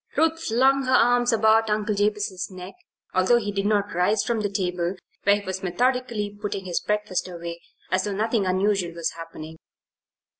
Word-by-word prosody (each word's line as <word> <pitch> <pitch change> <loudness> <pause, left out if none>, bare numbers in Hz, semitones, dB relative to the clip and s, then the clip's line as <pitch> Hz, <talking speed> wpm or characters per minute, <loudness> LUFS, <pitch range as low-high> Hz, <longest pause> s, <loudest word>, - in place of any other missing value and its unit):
Ruth 325 +1 +2
flung 265 +4 +3
her 255 - +3
arms 245 0 +4
about 220 0 +4
Uncle 210 0 0
Jabez's 205 -3 -1
neck, 185 0 -9 0.4
although 185 +6 +4
he 205 -3 -2
did 200 0 -1
not 205 -1 +1
rise 190 +5 +2
from 235 -2 -1
the 205 - -1
table 180 -2 -1 0.3
where 200 +1 +6
he 200 - -12
was 190 0 -4
methodically 230 +1 -1
putting 200 -2 -3
his 175 -2 -1
breakfast 210 -3 -1
away 170 -1 -7 0.3
as 185 0 +1
though 205 - -2
nothing 215 -1 0
unusual 185 -2 +1
was 170 -1 -1
happening. 160 -1 -9
205 Hz, 175 wpm, -24 LUFS, 185-225 Hz, 0.4 s, where